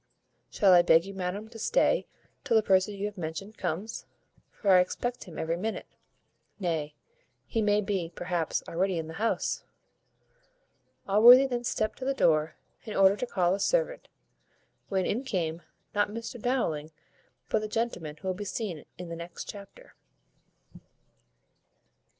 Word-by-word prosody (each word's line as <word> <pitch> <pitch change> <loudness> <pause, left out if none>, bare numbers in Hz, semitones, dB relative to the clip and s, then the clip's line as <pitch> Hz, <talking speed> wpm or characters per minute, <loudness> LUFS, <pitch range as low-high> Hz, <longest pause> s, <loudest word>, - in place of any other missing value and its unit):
Shall 195 -3 +4
I 175 - +8
beg 165 0 +5
you, 195 - -7
madam, 190 +3 -4
to 225 -1 -11
stay - - +2 0.4
till 235 -5 +3
the 220 - +3
person 190 +1 +3
you 200 +1 -3
have 205 -2 -5
mentioned 175 +6 -6
comes, 195 +8 -4 0.4
for 200 - 0
I 185 - +8
expect 245 +7 -2
him 175 -5 -11
every 165 +1 -1
minute? 220 +5 -3 0.7
nay, 160 -5 -2 0.5
he 225 - -1
may 210 0 +3
be, 195 -5 -2
perhaps, 175 -2 -2
already 185 +1 0
in 160 - -3
the 160 - -8
house." 230 - 0 1.4
Allworthy 240 +7 +8
then 245 -2 -2
stept 215 -2 -1
to 260 - -5
the 275 0 0
door, 155 - +2 0.3
in 215 - -6
order 195 0 +6
to 250 - -4
call 180 -5 +1
a 195 - -1
servant, - - 0 0.8
when 190 -2 0
in 240 +5 -1
came, 170 -9 -2 0.3
not 205 0 +2
Mr 230 +2 -7
Dowling, 165 - -1 0.6
but 220 - +2
the 215 - -4
gentleman 210 -9 -3
who 190 - -8
will 185 - +1
be 200 +3 -6
seen 200 -6 -4
in 180 0 -7
the 170 - -5
next 170 +1 -8
chapter. 205 - -11
195 Hz, 155 wpm, -28 LUFS, 175-220 Hz, 1.4 s, I